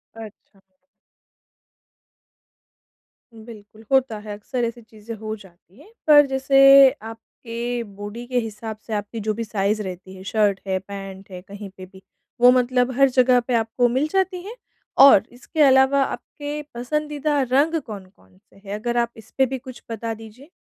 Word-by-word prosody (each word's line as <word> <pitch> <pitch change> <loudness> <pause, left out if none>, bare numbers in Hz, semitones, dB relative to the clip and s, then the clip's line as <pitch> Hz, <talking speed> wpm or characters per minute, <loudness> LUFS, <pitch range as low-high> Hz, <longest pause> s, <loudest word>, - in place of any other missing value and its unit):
अच्छा। 215 -2 -13 2.7
बिल्कुल, 220 -1 -14
होता 265 -4 +2
है, 210 0 -8
अक़्सर 240 +4 -4
ऐसी 235 +1 -6
चीज़ें 220 0 -10
हो 215 0 -5
जाती 190 +1 -20
है। 415 - -18 0.2
पर 295 -1 +8
जैसे 275 0 +6
आपके 230 +2 -6
बॉडी 205 +3 -9
के 250 0 0
हिसाब 220 -1 -6
से 225 - -5
आपकी 210 +2 -4
जो 215 0 -2
भी 230 +2 -4
साइज़ 210 0 -1
रहती 185 0 -8
है 190 - -11
शर्ट 205 -1 +1
है, 190 -1 0
पेंट 195 0 -10
हैं, 180 - -8
कहीं 200 0 -9
पे 185 - -9
भी, 190 +1 -17 0.4
वो 245 +1 +8
मतलब 250 0 +1
हर 275 0 +6
जगह 255 -1 +4
पे 245 +1 -4
आपको 225 +2 +1
मिल 260 +5 0
जाती 375 +1 -1
है? 440 +4 -8 0.4
और 270 -8 +8
इसके 255 +6 -4
अलावा 270 0 +5
आपके 290 +2 -6
पसंदीदा 295 +3 -2
रंग 305 +4 +2
कौन-कौन 195 -4 -13
से 205 - -29
हैं 200 +1 -5
अगर 235 +3 -3
आप 235 0 +1
इसपे 225 +5 -1
भी 265 +1 -4
कुछ 255 0 -12
बता 225 0 -4
दीजिए? 225 +6 -13
230 Hz, 160 wpm, -22 LUFS, 210-265 Hz, 2.7 s, पर